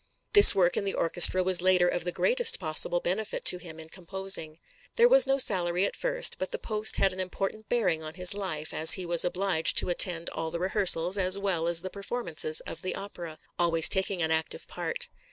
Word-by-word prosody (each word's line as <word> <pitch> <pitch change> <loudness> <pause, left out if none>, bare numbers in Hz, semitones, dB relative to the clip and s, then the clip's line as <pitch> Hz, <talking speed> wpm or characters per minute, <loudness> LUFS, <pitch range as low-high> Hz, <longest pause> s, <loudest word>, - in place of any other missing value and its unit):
This 410 - +9
work 180 -2 0
in - - -2
the 195 - -5
orchestra 175 +2 +4
was 185 -1 +3
later 185 -1 +1
of 175 -1 -4
the 175 - -3
greatest 485 - 0
possible 165 +1 0
benefit 205 +5 -5
to 180 - +3
him 160 -3 -13
in 160 0 -12
composing. 185 -3 -4 0.4
There 475 0 +3
was - - +4
no 270 0 0
salary 180 -6 +1
at - - -6
first, - - +1
but - - -5
the 485 - -5
post 215 - 0
had 195 -1 -1
an 185 - -8
important 195 +3 -7
bearing 185 -10 -2
on 155 0 -11
his 180 0 +2
life, 180 -7 -7
as 160 +1 +6
he 185 - -4
was 170 -1 +3
obliged 180 -2 -1
to - - +2
attend 175 -1 +1
all 160 - -6
the 170 - -7
rehearsals 185 0 0
as 185 +1 -1
well 185 -5 -4
as 170 -1 0
the 185 - -8
performances 195 -7 -3
of - - -10
the 185 - -6
opera, 175 -5 -11 0.2
always 165 -2 +1
taking 190 -2 -1
an 160 - -3
active 160 0 -4
part. - - -5
180 Hz, 210 wpm, -25 LUFS, 170-200 Hz, 0.4 s, This